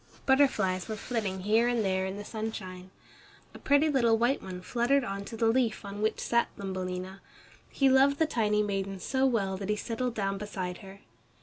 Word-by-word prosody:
Butterflies 265 -10 +2
were 220 - -3
flitting 210 -4 -3
here 220 +4 +3
and 240 -3 +1
there 190 0 0
in 190 +1 -5
the 205 - -7
sunshine. 190 -5 -6 0.6
A - - -11
pretty 285 +2 +3
little 235 -6 +3
white 240 +4 +1
one 185 -1 -7
fluttered 250 +6 +1
on 200 -2 -4
to 225 - -7
the 225 - +1
leaf 225 -2 +1
on 200 +1 -6
which 215 - 0
sat 235 0 +1
Thumbelina. 185 -1 -5 0.5
He 275 - +2
loved 270 +2 +5
the 320 - +3
tiny 210 -7 +1
maiden 195 -1 -3
so 265 +6 +1
well 195 -6 0
that 195 +1 -6
he 210 - +2
settled 235 +3 -3
down 195 -1 -1
beside 190 -4 -5
her. 195 +1 -12
210 Hz, 190 wpm, -29 LUFS, 195-240 Hz, 0.6 s, loved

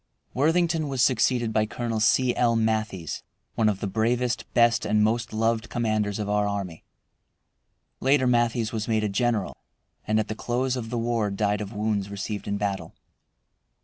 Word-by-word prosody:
Worthington 165 +2 +2
was 135 -3 +1
succeeded 120 -2 +2
by 110 0 +2
Colonel 115 -1 -3
C. 125 +3 +3
L. 120 -1 +2
Matthies, 110 -7 -1 0.3
one 110 -2 +2
of 100 -2 -2
the - - -1
bravest, 115 +3 -1
best, 120 0 +4
and 105 0 +2
most 115 +2 0
loved 115 +1 0
commanders 110 -3 0
of 105 -2 -3
our 105 0 +1
army. 100 -5 -4 1.2
Later 135 0 +3
Matthies 120 -2 +1
was 110 -2 -3
made 110 -2 +1
a 105 - 0
general, 110 0 0 0.5
and 110 0 +2
at 110 - -1
the - - -3
close 125 +3 -1
of 115 -3 -5
the 120 - -3
war 115 -2 0
died 105 +1 0
of 105 +1 -6
wounds 105 -1 -1
received 100 +1 -5
in 100 0 -1
battle. 100 -5 -3
110 Hz, 170 wpm, -25 LUFS, 105-120 Hz, 1.2 s, best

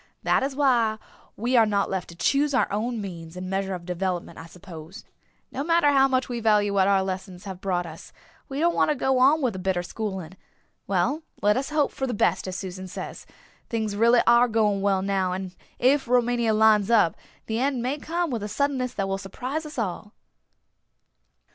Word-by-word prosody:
"That - - +2
is 270 0 -2
why 240 -6 +2 0.4
we 240 +4 0
are 230 -2 +6
not 200 -1 +1
left 190 -2 -4
to 170 - -11
choose 280 - +1
our 255 - +3
own 225 +3 -2
means 170 -4 -7
and 185 0 -5
measure 195 0 -1
of 175 -1 -9
development, 180 0 -3
I 165 - -9
suppose. 170 -3 -11 0.5
No 275 - -3
matter 335 -2 +3
how 270 -1 +5
much 260 -1 0
we 240 -1 -4
value 210 -2 +2
what 195 -1 +3
our 195 -1 +3
lessons 185 -1 -5
have 190 -2 -7
brought 180 -3 -1
us 160 -1 -11 0.4
we 275 +1 -4
don't 340 +2 +3
want - - +2
to 300 - +2
go 265 -1 +1
on 285 +4 +4
with 245 -4 +1
the 190 - -6
bitter 185 -1 -1
schooling. 190 -3 -5 0.5
Well, 305 +3 0 0.2
let 210 +1 +4
us 270 +1 -2
hope 305 -1 +1
for 265 - -3
the 245 - -2
best, 185 -2 +1
as 185 - -4
Susan 185 0 -6
says; - - -8 0.4
things 220 -3 -2
are 205 - -5
really 235 +1 +5 0.3
going 210 -3 +2
well 195 -1 +1
now 190 -2 0
and 185 -1 -5 0.2
if 265 +2 +2
Rumania 240 -2 +2
lines 215 -1 +4
up, 215 -8 +4 0.3
the 225 +1 -2
end 260 -2 0
may 270 +4 -2
come 340 +1 -2
with 235 -3 -2
a 210 - -3
suddenness 255 0 -1
that 195 - -1
will 195 0 -2
surprise 260 +10 -5
us 300 - -11
all." 210 0 -4
215 Hz, 205 wpm, -25 LUFS, 190-255 Hz, 0.5 s, are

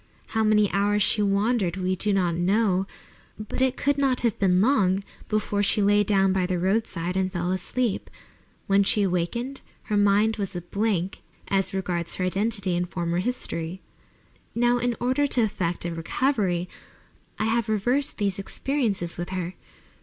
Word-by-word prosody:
How 220 0 0
many 210 -1 +4
hours 205 +1 +2
she 210 - +3
wandered, 200 -2 +1
we 185 0 0
do 210 +3 -1
not 180 -3 +1
know, 190 +2 +1 0.5
but 215 +4 -5
it 260 -1 +2
could 285 0 +1
not 265 -3 +2
have 235 -4 0
been 185 -2 +3
long 200 -5 +2 0.3
before 210 -1 0
she 205 +1 +2
lay 205 0 +4
down 195 -2 +2
by 185 -2 +1
the 180 -1 -1
roadside 185 -2 -1
and 190 0 0
fell 175 -1 -2
asleep. 215 +4 -2 0.6
When 195 0 +3
she 205 +1 +4
awakened 200 +9 -2 0.2
her 210 - -1
mind 205 +2 +3
was 195 -2 -3
a 175 - -3
blank 195 0 -2 0.3
as 195 -1 +1
regards 180 -3 -3
her 185 - -1
identity 195 0 0
and 175 0 -1
former 175 -1 -2
history. 185 -6 -3 0.8
Now, 240 +1 +2
in 245 0 0
order 260 +4 +1
to 250 -4 +2
effect 175 -5 -2
a 170 - -2
recovery, 180 - 0 0.7
I - - -1
have 225 0 0
reversed 245 +7 +1
these 200 -2 -1
experiences 205 -5 -1
with 175 - -4
her. 185 -1 -3
200 Hz, 165 wpm, -25 LUFS, 185-225 Hz, 0.8 s, many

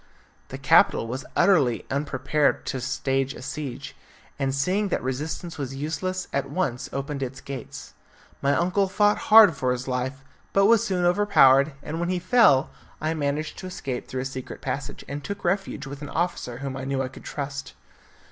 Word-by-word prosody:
The - - -7
capital - - +4
was 130 +5 -5
utterly 135 - +3
unprepared 140 +1 0
to 130 - -3
stand 135 +1 -1
a - - -9
siege, 135 -1 -6 0.4
and 135 -1 0
seeing 185 +10 0
that 185 - -2
resistance 150 +6 -4
was 135 -1 -4
useless, 185 +6 -3
at 140 - -1
once 135 -9 -2
opened 140 +1 -4
its 130 0 -4
gates. 135 -3 -8 0.5
My 140 0 +2
uncle 185 +3 +1
fought 205 +2 +3
hard 215 -6 +9
for 130 -2 0
his 125 +1 -3
life, 130 +1 -3 0.3
but 195 0 +4
was 225 0 +5
soon 180 -2 0
overpowered, 150 -7 +5
and 160 +2 -4
when 175 +1 -1
he 185 - 0
fell 180 - +4 0.3
I 155 +1 -1
managed 150 0 -2
to 185 - -6
escape 135 -8 -5
through 130 - -3
a - - -4
secret 130 -1 -6
passage, 140 0 -5
and 145 +1 -5
took 200 +5 -6
refuge 190 -5 -1
with 140 +1 -8
an 145 - -6
officer 160 -8 -2
whom 135 0 -5
I 130 - -5
knew 135 0 -1
I - - -2
could 130 - -12
trust. 140 -1 -5
140 Hz, 180 wpm, -25 LUFS, 135-175 Hz, 0.5 s, hard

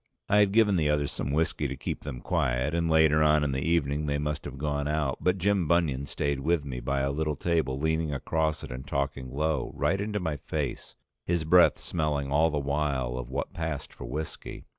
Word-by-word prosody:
I 105 - +3
had 100 -2 +4
given 105 -3 +4
the 75 -3 +2
others 75 -1 +1
some 70 - -3
whiskey 75 -1 0
to 70 - -4
keep - - -4
them 60 - -6
quiet, 65 +5 0
and 85 -1 +1
later 80 -1 +5
on 75 0 +4
in 70 - 0
the 65 0 -1
evening 75 -2 0
they 70 0 0
must 75 0 -3
have 70 - -7
gone 70 0 -1
out, 75 -3 -1
but 90 +1 +2
Jim 95 -2 +1
Bunion 75 -5 +1
stayed 70 0 -1
with 80 +2 +1
me 65 -3 -4
by 70 +3 -1
a 70 +1 0
little 75 +1 -1
table 80 -4 0
leaning 80 +1 0
across 80 +2 -1
it - - -7
and 65 +2 -7
talking 70 -2 -2
low, 75 0 -1
right 95 +3 +1
into 105 0 -2
my 80 -5 -2
face, 70 0 -4 0.3
his 85 -2 0
breath 90 +3 +5
smelling 75 -4 -2
all 80 +3 +4
the 75 - -2
while 70 -3 -1
of 60 -1 -5
what 65 - -3
passed 80 -2 -4
for - - -9
whiskey. 75 +6 -6
75 Hz, 215 wpm, -28 LUFS, 70-80 Hz, 0.3 s, later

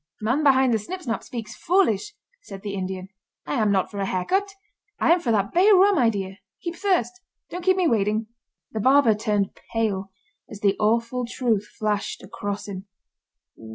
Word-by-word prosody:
"Man 240 +8 0
Behind 265 -4 +4
The 220 - +2
Snip 365 - -7
Snap 230 -4 -2
speaks 225 -3 -7
foolish," 360 - +1 0.3
said 195 - -10
the 205 -2 -4
Indian. 190 -1 -4 0.4
"I - - -3
am 210 -1 +3
not 190 -2 +1
for 200 - -6
a 195 - -1
hair 185 -1 -1
cut; 400 +1 +1 0.5
I - - +3
am 355 - +2
for 250 -9 -1
that 200 -2 +1
bay 370 +4 +5
rum 390 -2 +5
idea. 200 -5 0 0.2
Heap 340 -1 -5
thirst! 370 -1 +1 0.4
Don't 360 0 -5
keep 375 +1 +3
me 365 -2 +3
waiting!" 215 -3 +1 0.5
The 220 - -3
barber 260 0 +5
turned 210 -2 -1 0.2
pale 205 -4 -1 0.4
as 210 -1 -10
the 200 -1 +3
awful 230 +3 +1
truth 225 -5 0
flashed 210 -2 -2
across 205 0 -5
him. 195 0 -7
220 Hz, 180 wpm, -24 LUFS, 200-295 Hz, 0.5 s, bay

